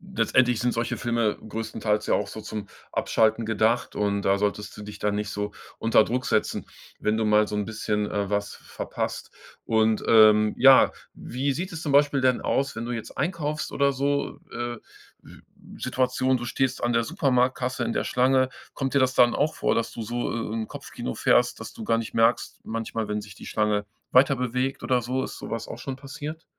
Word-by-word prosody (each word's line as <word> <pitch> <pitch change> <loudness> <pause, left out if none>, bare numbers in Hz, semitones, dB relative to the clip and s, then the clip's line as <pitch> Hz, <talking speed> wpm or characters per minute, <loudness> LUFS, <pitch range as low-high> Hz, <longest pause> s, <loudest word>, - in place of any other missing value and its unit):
letztendlich 125 -3 +3
sind 120 0 +1
solche 115 +1 -1
Filme 115 -3 0
größtenteils 110 -1 -2
ja - - +2
auch 100 - -1
so 110 - -7
zum 105 -1 -6 0.3
Abschalten 110 +1 +2
gedacht, 110 +2 +1
und 100 -1 0
da 100 0 +3
solltest 105 0 -2
du 105 - -8
dich 105 0 -9
dann 105 -1 0
nicht 105 0 -2
so 105 0 -3 0.3
unter 115 -1 +5
Druck 125 +1 -2
setzen, 110 - 0 0.3
wenn 105 +1 +1
du 110 - +1
mal 105 0 +4
so 105 - -4
'n 105 -1 -1
bisschen, 105 -1 -2
äh, 100 -1 -1
was 100 0 -2
verpasst. - - -5 0.3
Und, 110 -1 +2
ähm, 110 -1 +6
ja, 135 +1 +7 0.2
wie 135 +3 -2
sieht 180 +6 -4
es 160 - -5
zum 150 - -1
Beispiel 145 -1 +4
denn 130 -1 +3
aus, 140 +1 0
wenn 115 +1 -4
du 120 - -4
jetzt 115 -2 -7
einkaufst 150 -2 -2
oder 140 0 +3
so? 140 +2 -1
Äh, 120 0 -4 0.4
w - - -15 0.4
Situation: 130 0 +1
Du 120 - -6
stehst 130 +2 -1
an 120 0 +1
der 115 0 +3
Supermarktkasse 130 -4 0
in 115 - -1
der - - -1
Schlange. 130 +1 +3 0.2
Kommt 135 -2 -3
dir 140 - +5
das 130 0 +2
dann 120 -1 +5
auch 155 +2 +1
vor, - - +1
dass 115 - -1
du 115 - -7
so, 120 +3 -2
äh, - - -3 0.2
'n 110 -1 -3
Kopfkino 60 - -6
fährst, - - +2
dass - - -8
du - - -8
gar 115 - +2
nicht 115 - -6
merkst 115 +1 +2
manchmal, 115 -1 -3
wenn 105 0 -2
sich 100 -1 -12
die - - -12
Schlange 105 -1 0 0.3
weiterbewegt 130 0 +2
oder 125 -1 +2
so? 130 +3 -2
Ist - - -6
so - - -7
was 115 0 -3
auch - - -7
schon 130 +1 -5
passiert? 145 +3 -7
115 Hz, 205 wpm, -25 LUFS, 105-130 Hz, 0.4 s, ja